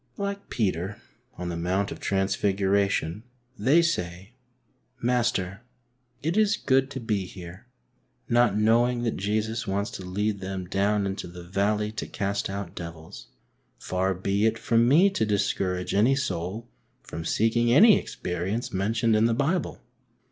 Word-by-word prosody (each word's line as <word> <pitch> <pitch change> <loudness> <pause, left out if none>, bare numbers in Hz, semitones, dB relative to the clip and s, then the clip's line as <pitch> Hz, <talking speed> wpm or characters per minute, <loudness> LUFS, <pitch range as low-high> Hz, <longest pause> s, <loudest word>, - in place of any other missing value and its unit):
Like 200 0 -4
Peter 95 -3 -1 0.4
on 90 0 -4
the 85 - -3
Mount 95 +4 -1
of - - -7
Transfiguration, 100 -1 0 0.3
they 135 +10 +4
say, 95 - -2 0.3
" 130 +1 -43
Master, 110 -6 0 0.6
it 165 +4 0
is 210 -1 +3
good 135 0 +2
to 135 - -5
be 105 -5 -2
here,'* 90 -1 -11 0.6
not 120 -3 +3
knowing 120 +3 +3
that 115 - -1
Jesus 110 +3 -2
wants 100 +2 -1
to 95 - -7
lead 100 +3 -2
them 95 -1 -5
down 100 +2 +1
into 95 -1 -4
the 90 0 -10
valley 105 +4 0
to 110 - -5
cast 100 0 -2
out 100 -2 -5
devils. 85 -3 -9 0.5
Far 95 +1 -1
be 100 +4 +1
it 110 0 0
from 115 +1 +2
me 175 +10 +5
to 190 - 0
discourage 95 -3 -1
any 115 +7 +4
soul 105 -3 -3 0.4
from 80 - -7
seeking 115 +6 +2
any 205 - +7
experience 95 +7 -4
mentioned 110 +4 +1
in 110 +1 +4
the 115 -1 +2
Bible 165 +8 -1
105 Hz, 150 wpm, -26 LUFS, 95-120 Hz, 0.6 s, any